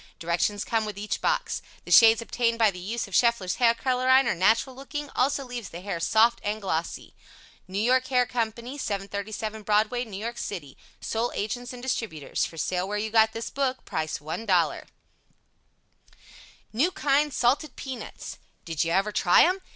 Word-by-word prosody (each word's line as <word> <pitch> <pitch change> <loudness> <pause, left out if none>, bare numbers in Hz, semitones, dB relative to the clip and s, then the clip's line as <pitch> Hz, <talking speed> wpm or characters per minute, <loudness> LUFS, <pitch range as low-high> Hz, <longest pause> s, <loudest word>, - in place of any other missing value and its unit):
Directions 170 +5 -1
come 225 -1 0
with 210 -2 -6
each 210 +1 -3
box. - - 0 0.2
The - - -8
shades 225 0 +7
obtained 230 0 0
by 220 -3 +4
the 180 - -9
use 215 +5 -3
of 195 - -14
Scheffler's 235 -6 +2
Hair 235 -2 +4
Colorine 255 +2 +3
are - - +2
natural 220 +8 +2
looking 290 +2 -6
also 275 +2 +1
leaves 245 -3 -6
the 170 - -8
hair 190 -3 -4
soft 225 +6 +3
and 210 +1 -2
glossy. 170 -5 -3 0.5
NEW 190 +2 -3
YORK 255 +3 +2
HAIR 250 -2 +3
COMPANY 235 +3 -3
737 210 +1 -4
Broadway, 215 +4 +1
N. 205 -5 -8
Y. 230 +3 -4
City. 170 - -6 0.2
Sole 230 +2 -2
Agents 245 +4 -3
and 250 -1 -10
Distributors 220 - -2
For 165 - -9
Sale 180 +3 -1
where 210 +1 -2
you 215 +1 -3
got 220 0 +4
this 225 0 -5
book. 265 -2 -2
Price 155 0 -2
$1.00 175 +3 0 1.9
NEW 275 +11 +2
KIND 295 -5 +1
SALTED 270 +5 +1
PEANUTS 265 -2 -7 0.3
Did 165 -3 -1
you 165 - -2
ever 195 +4 +1
try 180 -3 +5
them? 365 +3 +2
225 Hz, 170 wpm, -26 LUFS, 200-250 Hz, 1.9 s, shades